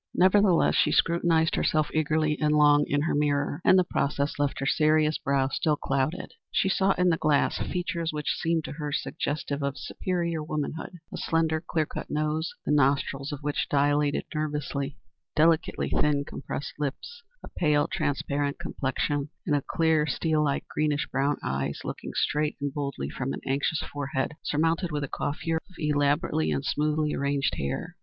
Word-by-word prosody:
Nevertheless 190 -1 +4
she - - +3
scrutinized 165 -1 +3
herself 155 -1 +1
eagerly 155 0 +1
and 150 0 +3
long 145 -1 +5
in 145 0 +1
her 165 - 0
mirror, 145 +1 0
and 185 - +6
the 185 - +5
process 140 -3 -1
left 145 -1 0
her 135 - -2
serious 155 +1 +3
brow 135 -1 +1
still 150 +2 +1
clouded. 135 +5 -2 0.2
She 190 - +1
saw 195 0 +3
in 180 0 +2
the 165 - +2
glass 150 -3 +2
features 170 -2 -2
which 150 -1 -2
seemed 165 -1 0
to - - -6
her 150 -1 -4
suggestive 145 0 -2
of 140 0 -2
superior 170 -3 -2
womanhood, 155 +3 -4 0.2
a - - -4
slender 160 -1 +1
clear 160 -1 -1
cut - - -7
nose, 155 +1 -1
the - - 0
nostrils 140 0 +1
of 145 -1 -6
which 145 0 -1
dilated 145 0 +2
nervously, 150 -2 -3 0.4
delicately 160 +1 +2
thin, 145 -1 +2
compressed 140 - -6
lips, 150 - -4 0.2
a - - -8
pale, 150 -3 +3
transparent 140 0 -1
complexion, 145 -2 -2 0.2
and 145 -2 0
clear, 160 -2 +2
steel 155 -1 +1
like, 140 -2 -1
greenish 150 -1 0
brown 140 +2 +1
eyes 70 +1 -2
looking - - -6
straight 150 0 0
and 140 -1 -3
boldly 140 - -3
from 135 - -3
an - - -6
anxious 140 +3 0
forehead 135 -2 -2
surmounted 165 +3 0
with 145 -1 -2
a - - -2
coiffure 160 +4 -2
of 185 - -19
elaborately 145 - +1
and 70 -2 -1
smoothly 150 0 0
arranged 140 0 0
hair. 70 0 -3
150 Hz, 165 wpm, -27 LUFS, 140-160 Hz, 0.4 s, and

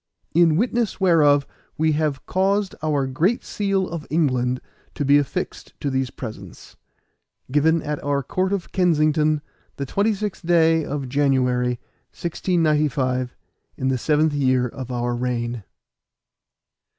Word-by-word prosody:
In 165 -1 +5
witness 235 +2 0
whereof 150 -6 +4 0.3
we 160 0 +2
have 150 -3 -1
caused 195 +1 +1
our 150 -3 +1
Great 165 - 0
Seal 195 -2 -1
of 165 -3 -6
England 130 -5 +1 0.4
to 145 - -2
be 145 +1 +6
affixed 140 - -5
to 140 - -2
these 130 -1 0
presents. 110 -8 -9 0.8
Given 160 +3 +3
at 150 0 -4
our 140 -1 0
Court 185 +8 -1
of 200 -3 -3
Kensington, 155 -4 +2 0.3
the 140 - -4
26th 205 - -1
day 165 -1 +4
of 140 -2 -4
January, 125 -3 +1 0.4
1695, 150 -7 0 0.4
in 130 - 0
the 130 - +1
seventh 155 +1 +2
year 130 -3 +2
of 130 +1 -7
our 120 0 -1
reign." 120 -2 -2
150 Hz, 125 wpm, -22 LUFS, 130-170 Hz, 0.8 s, be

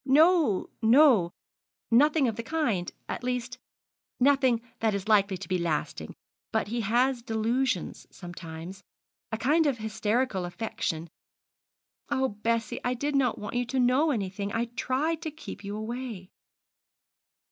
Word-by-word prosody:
'No, 305 - +4
no; 230 - +6 0.6
nothing 290 +3 +5
of 225 - -1
the 230 - -3
kind 230 - -1 0.2
at - - -4
least, 250 0 -3 0.6
nothing 260 -3 +4 0.2
that 220 -2 +1
is 200 +1 -4
likely 200 -3 +3
to 195 - -8
be 185 -1 0
lasting; 165 -3 -2 0.4
but 220 -2 0
he 235 +1 -1
has 240 +4 +2
delusions 225 -1 -1
sometimes 175 +1 -9 0.5
a 220 - -1
kind 300 +8 +3
of 270 -4 +1
hysterical 220 -1 -1
affection. 175 -3 -3 1.0
Oh, 265 0 +1
Bessie, 225 +1 -1
I 250 0 0
did 285 +4 -2
not 260 -4 +2
want 210 - -6
you 245 0 0
to 265 +1 -1
know 255 +6 +3
anything; 200 -5 -2
I 230 +2 0
tried 300 +7 0
to 325 - -3
keep 310 -7 -9
you 200 +1 -5
away.' 220 -4 -6
230 Hz, 140 wpm, -28 LUFS, 205-265 Hz, 1.0 s, no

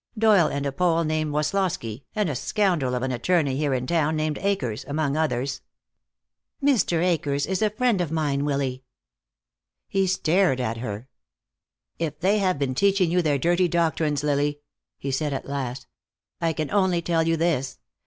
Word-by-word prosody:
Doyle 210 -7 +5
and 140 0 -3
a 140 - 0
Pole 170 +2 +1
named 155 -1 -1
Woslosky, 150 - -1
and 210 -3 +1
a 150 - -1
scoundrel 170 - 0
of 125 - -2
an 130 - -1
attorney 140 +2 +1
here 145 -1 0
in 125 0 -2
town, 160 +1 +1
named 155 -1 -1
Akers, 140 - -1
among 145 -1 -1
others." 140 -4 -1 1.0
"Mr. 220 - +2
Akers 145 -5 0
is 190 +3 -2
a 215 - +3
friend 220 -2 +1
of 165 -4 -2
mine, 145 -3 0
Willy." 135 -3 -1 1.0
He 195 -1 +1
stared 180 -4 +2
at 115 -2 -2
her. 115 0 -5 0.9
"If 155 -3 -3
they 195 +5 +2
have 185 -5 +1
been 140 -2 -1
teaching 195 +3 +2
you 180 +1 +3
their 150 -4 +1
dirty 175 +5 +2
doctrines, 160 -3 0
Lily," 145 0 0 0.4
he 135 - -4
said 145 +2 -1
at 135 - -4
last, 135 -2 -4 0.6
"I 165 -1 +1
can 155 -1 -3
only 185 -4 +2
tell 165 -1 +1
you 165 0 +2
this. 160 -5 0
155 Hz, 170 wpm, -24 LUFS, 140-180 Hz, 1.0 s, Doyle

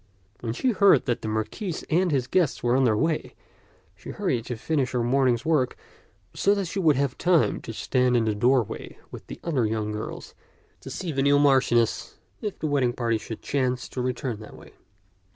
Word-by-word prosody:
When 115 0 -3
she 250 - +1
heard 200 -2 +5
that 120 -3 -1
the - - -5
Marquis 110 - -3
and 180 +3 +2
his 135 -5 +1
guests 170 0 0
were 120 0 +2
on 135 0 +3
their 110 -3 +3
way, 160 +3 -1 0.6
she - - -12
hurried 115 -2 -2
to 125 - -4
finish 140 +2 -1
her 120 -1 +1
morning's 125 -1 +2
work, 150 -6 +1 0.6
so 200 +1 +2
that 200 -1 -1
she 185 +3 -4
would 160 -6 +4
have 140 0 -1
time 175 -3 +2
to - - -7
stand 125 +2 +1
in 115 - +1
the 110 - +1
doorway 120 +1 0
with - - -10
the - - -8
other 135 -9 0
young 105 -1 -2
girls 105 +1 -6 0.5
and - - -8
see 180 -3 -4
the 135 -2 -1
new 140 +1 +4
Marchioness, 130 -5 +2 0.2
if 210 -3 -4
the - - -5
wedding 135 -5 +1
party 115 -2 0
should 110 0 -8
chance 130 -3 -1
to 125 - -4
return 125 -2 -3
that 110 - -11
way. - - -15
130 Hz, 200 wpm, -25 LUFS, 120-155 Hz, 0.6 s, heard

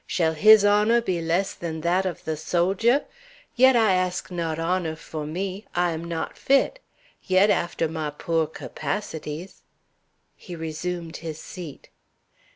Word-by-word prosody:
Shall 160 -3 +1
his 215 +5 +7
honor 210 +3 +4
be 185 -7 -2
less 170 +4 0
than 160 -2 -5
that 180 +3 +1
of 180 - -5
the 160 - -2
soldier? 190 - +1 0.5
Yet 260 +1 +6
I 220 -4 +4
ask 185 0 -1
not 165 -3 -2
honor; 165 -1 -1
for 155 -1 -7
me, 190 +5 -4
I 175 0 +2
am 165 +1 -5
not 170 -1 -4
fit; 275 - +2 0.4
yet, 190 +3 +4
after 170 -1 0
my 155 -1 -3
poor 160 +2 -1
capacities" 160 0 -5 0.7
He 175 - -9
resumed 165 +1 -5
his 160 -2 -6
seat. 165 -4 -9
175 Hz, 145 wpm, -25 LUFS, 160-195 Hz, 0.7 s, his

